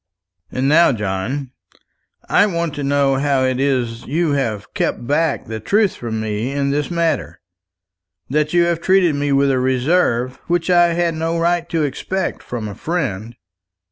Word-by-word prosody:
And 130 +1 -1
now, 165 +4 +5
John, 110 +5 -3 0.8
I 205 - +4
want 170 -5 -2
to 145 -1 -4
know 140 -1 +2
how 140 -1 +1
it 130 -1 0
is 125 -4 0
you 160 +3 0
have 115 -8 -2
kept - - -2
back 150 +3 0
the 110 0 -5
truth 200 - +1
from 110 -2 -4
me 110 +3 -2
in 140 0 0
this 145 +1 -1
matter; 170 -4 -1 0.9
that 150 +2 0
you 175 0 +4
have 170 -1 0
treated 185 -3 +3
me 145 0 -1
with 140 0 +3
a 130 - +1
reserve 130 -1 +1
which 175 +1 0
I 175 -1 +4
had 170 0 0
no 165 +1 -2
right 170 0 0
to 165 -2 0
expect 185 +7 -3
from 115 -3 -5
a 105 - -6
friend." 120 - -3
145 Hz, 170 wpm, -19 LUFS, 125-170 Hz, 0.9 s, now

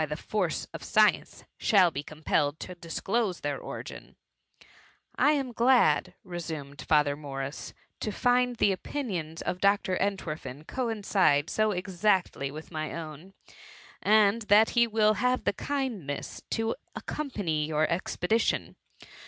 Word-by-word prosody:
41 150 0 -3
the - - -14
force 215 - -1
of - - -7
science, - - +2 0.2
shall 185 -5 +5
be 140 - -4
compelled 150 0 -1
to 180 - -6
dis 170 -2 -6
close 205 -3 0
their 145 -1 -2
origin/^ - - -8 0.5
" - - -26 0.2
I 295 - +4
am 270 -4 -1
glad,^ 235 - +3
resumed 160 -6 -6
Father 150 -2 +3
Morrisi 140 -1 -6
" - - -48
to 215 - -2
find 245 +3 +2
the 205 - +3
opinions 185 - -4
of 180 - -3
Dr« 200 -2 +3
Entwerfen 155 -8 -3
coincide 200 - +1
so 215 0 +2
exactly 185 -6 0
with 155 +4 -9
my 155 -2 -3
own, 165 +3 -8 0.7
and 215 +1 +4
that 215 +2 +6
he 235 -1 +4
will 215 -1 +3
have 250 +3 +1
the - - +1
kindness 230 - -4
to 225 0 0 0.2
accompany 190 - -2
your 155 0 +1
expedition. 185 +5 0
185 Hz, 140 wpm, -28 LUFS, 155-220 Hz, 0.7 s, that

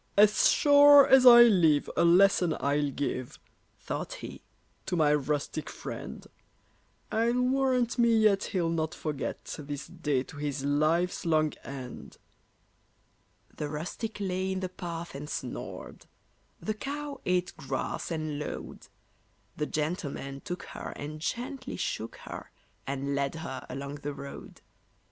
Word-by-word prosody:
"As 210 +1 +6
sure 285 -1 +7
as 260 -1 +7
I 240 -1 +11
live, 170 -10 +4
a - - +3
lesson 180 -1 +4
I'll 145 +1 +1
give," 130 -2 -4 0.4
Thought - - -4
he, - - -9 0.5
"to 180 - -1
my 150 -3 +4
rustic 150 +1 -2
friend. - - -7 0.9
I'll 235 +3 +2
warrant 255 -2 +1
me 235 -1 +5
yet 210 -2 +3
he'll 175 -5 -1
not 160 0 -1
forget 150 -3 -4
This 145 -1 -6
day 150 -7 -1
to 145 - -12
his 145 -1 -3
life's 155 +5 +1
long 155 -2 +2
end." 130 -3 -8 1.4
The 150 - -4
rustic 175 +9 -5
lay 190 -1 -1
in 190 - -3
the 185 - -3
path 170 -2 -6
and 145 +2 -7
snored; - - -6 0.5
The 215 - -2
cow 285 +4 -5
ate 180 0 0
grass 135 -1 -4
and 155 -3 -3
lowed; 150 - -7 0.7
The 150 - -2
gentleman 150 -3 -3
took 180 0 -6
her - - -7
and 150 +2 -6
gently 255 - -4
shook - - -3
her, - - -8 0.4
And 140 +1 -2
led 140 +1 -1
her 135 -5 -6
along 140 +2 -5
the 145 0 -5
road. 140 0 -10
165 Hz, 135 wpm, -29 LUFS, 145-210 Hz, 1.4 s, I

